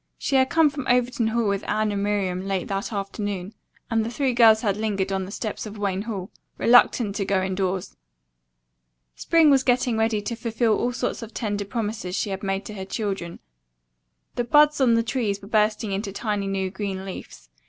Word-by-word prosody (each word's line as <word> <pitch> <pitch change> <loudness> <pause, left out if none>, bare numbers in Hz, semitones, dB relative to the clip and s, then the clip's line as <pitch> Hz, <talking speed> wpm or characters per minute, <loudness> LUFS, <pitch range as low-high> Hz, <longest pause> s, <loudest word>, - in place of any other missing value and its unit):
She 275 - -1
had 260 0 +4
come 325 -3 +4
from 280 -3 -6
Overton 245 -1 +2
Hall 230 0 0
with 200 0 -1
Anne 215 0 +1
and 200 -1 -2
Miriam 200 -3 -1
late 190 -2 -1
that 195 +2 -2
afternoon 200 -1 -4 0.4
and 225 -1 +2
the 225 - -3
three 260 +1 0
girls 225 -2 +6
had 200 -3 +1
lingered 200 -3 -1
on 190 -1 -1
the 190 - -9
steps 215 0 -4
of 215 0 -9
Wayne 200 -2 -1
Hall, 200 -4 -5 0.3
reluctant 235 -3 +4
to 200 - 0
go 195 0 +1
indoors. 190 -1 -2 1.2
Spring 320 - +4
was 270 -2 +5
getting 245 -3 +1
ready 220 -1 +1
to 205 +3 -4
fulfill 230 -1 0
all 245 - 0
sorts 250 0 -3
of 230 0 -9
tender 205 -3 -2
promises 210 -3 -3
she 205 - -1
had 190 0 -4
made 195 0 -2
to 215 - -7
her 195 -2 -6
children. 195 -4 -4 1.0
The 245 - -1
buds 295 +4 +4
on 240 -3 +5
the 230 - +2
trees 225 -5 -1
were 200 - -12
bursting 215 -1 +1
into 195 +1 -3
tiny 205 -1 -2
new 190 -1 -2
green 195 -2 -4
leaves. - - -9
210 Hz, 195 wpm, -24 LUFS, 195-235 Hz, 1.2 s, girls